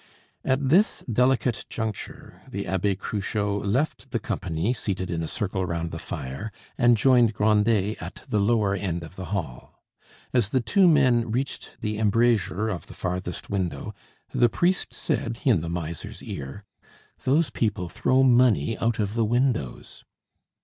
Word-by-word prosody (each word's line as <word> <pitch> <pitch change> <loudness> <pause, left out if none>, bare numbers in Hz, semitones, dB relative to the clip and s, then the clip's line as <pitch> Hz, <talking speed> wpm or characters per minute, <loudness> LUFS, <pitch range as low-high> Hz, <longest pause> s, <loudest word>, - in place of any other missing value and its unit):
At 130 0 +1
this 190 +9 +3
delicate 125 0 +1
juncture 110 -3 -5
the 100 0 -4
Abbe 95 +1 0
Cruchot 100 +1 -2
left 130 +7 -1
the 120 - -1
company 90 0 -2
seated 95 -6 -3
in 85 -1 -1
a 80 - -2
circle 95 +1 -2
round 85 -2 -2
the 80 - -5
fire 80 +3 -5 0.2
and 120 -1 +4
joined 120 -2 +4
Grandet 105 0 +2
at - - -8
the 110 -6 +1
lower 105 -1 +2
end 90 -4 -2
of 85 +2 -11
the 95 - -6
hall. 85 -10 -5 0.5
As 120 -5 +3
the 130 - +2
two 185 - +4
men 130 -7 +4
reached 130 +5 -3
the 105 -1 -2
embrasure 110 -1 +2
of 95 -7 -4
the - - -12
farthest 90 +1 -4
window 95 -4 -2 0.4
the 120 - +4
priest 180 - +1
said 115 0 -2
in 115 - +4
the 85 - -4
miser's 85 -2 -5
ear: 70 +10 -7 0.6
"Those 145 +4 +2
people 100 -6 -1
throw 130 +10 +2
money 120 - +4
out 115 -1 +1
of 105 -1 -1
the 115 0 +1
windows." 120 - -1
105 Hz, 155 wpm, -25 LUFS, 95-120 Hz, 0.6 s, and